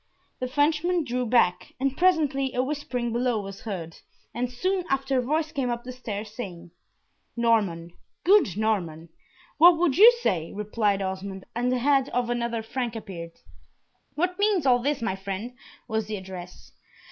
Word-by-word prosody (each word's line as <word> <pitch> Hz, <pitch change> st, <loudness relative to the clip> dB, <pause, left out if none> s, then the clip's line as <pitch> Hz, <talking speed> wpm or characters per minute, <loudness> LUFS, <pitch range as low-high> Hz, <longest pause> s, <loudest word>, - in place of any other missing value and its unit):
The 255 Hz, -, -2 dB
Frenchman 310 Hz, +6 st, +1 dB
drew 250 Hz, -2 st, -2 dB
back, 200 Hz, -7 st, +2 dB
and 270 Hz, 0 st, 0 dB
presently 295 Hz, -7 st, +2 dB
a 250 Hz, -, +2 dB
whispering 255 Hz, -4 st, -3 dB
below 240 Hz, -1 st, +1 dB
was 195 Hz, -1 st, -8 dB
heard, 175 Hz, -7 st, -6 dB, 0.4 s
and 245 Hz, +1 st, -2 dB
soon 370 Hz, +9 st, -1 dB
after 270 Hz, -1 st, +1 dB
a -, -, +2 dB
voice 310 Hz, +5 st, -1 dB
came 265 Hz, -3 st, -1 dB
up 240 Hz, 0 st, -3 dB
the 255 Hz, -, -7 dB
stairs, 215 Hz, -4 st, -6 dB
saying, 175 Hz, -7 st, -7 dB, 0.7 s
"Norman 205 Hz, -8 st, +1 dB, 0.3 s
good 345 Hz, -, +4 dB
Norman 175 Hz, -7 st, -1 dB, 0.2 s
" -, -, -29 dB
"What 340 Hz, +1 st, +8 dB
would 335 Hz, -4 st, +1 dB
you 455 Hz, +4 st, +11 dB
say?" 165 Hz, -, 0 dB
replied 210 Hz, -1 st, 0 dB
Osmond, 190 Hz, 0 st, -5 dB
and 245 Hz, +1 st, 0 dB
the 255 Hz, -, +1 dB
head 270 Hz, +1 st, +2 dB
of 245 Hz, -1 st, -1 dB
another 235 Hz, -1 st, -2 dB
Frank 240 Hz, 0 st, -3 dB
appeared. 175 Hz, -6 st, -7 dB, 0.8 s
"What 360 Hz, +4 st, -1 dB
means 405 Hz, -7 st, +2 dB
all 250 Hz, -2 st, +5 dB
this, 280 Hz, 0 st, -1 dB
my 225 Hz, -4 st, -1 dB
friend?" 195 Hz, +5 st, -5 dB, 0.3 s
was 220 Hz, -2 st, -2 dB
the 215 Hz, -, -3 dB
address. 185 Hz, -2 st, -10 dB
240 Hz, 165 wpm, -26 LUFS, 200-275 Hz, 0.8 s, you